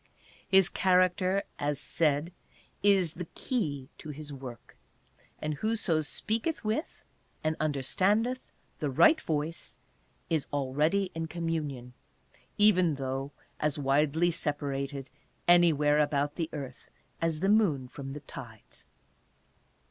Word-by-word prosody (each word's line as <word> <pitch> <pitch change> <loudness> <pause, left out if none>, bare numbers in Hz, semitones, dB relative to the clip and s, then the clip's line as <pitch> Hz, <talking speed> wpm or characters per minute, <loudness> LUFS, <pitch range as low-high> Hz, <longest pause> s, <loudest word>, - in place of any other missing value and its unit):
His 190 -1 +6
character, 185 +1 +2 0.2
as 145 0 0
s - - -8
aid, 155 +2 +2 0.5
is 195 -5 +3
the 175 -1 -6
key 150 - -2
to 155 - -8
his 150 0 -7
work, 130 -4 -10 0.6
and 155 0 -2
"Whoso 210 -2 +1
speaketh 220 - -2
with," 220 +9 -2 0.4
and 155 0 +1
understandeth 195 - +1 0.3
"the 150 - -1
right 315 - +5
voice," 155 +2 -3 0.5
is 160 -4 0
already 150 +8 +1
in 165 0 -3
communion, 155 -7 -3 0.6
even 185 -6 +5
though 135 +1 -3 0.3
as 150 -1 0
widely 150 +4 +2
separated 140 -4 -2 0.2
" - - -40
anywhere 155 -4 +5
about 145 -1 +1
the 165 -2 -3
earth" 135 -4 -7 0.3
as 165 -1 0
the 195 - +2
moon 180 -12 +3
from 135 +1 -7
the 145 - -7
tides. 120 -6 -11
155 Hz, 120 wpm, -30 LUFS, 140-185 Hz, 0.6 s, His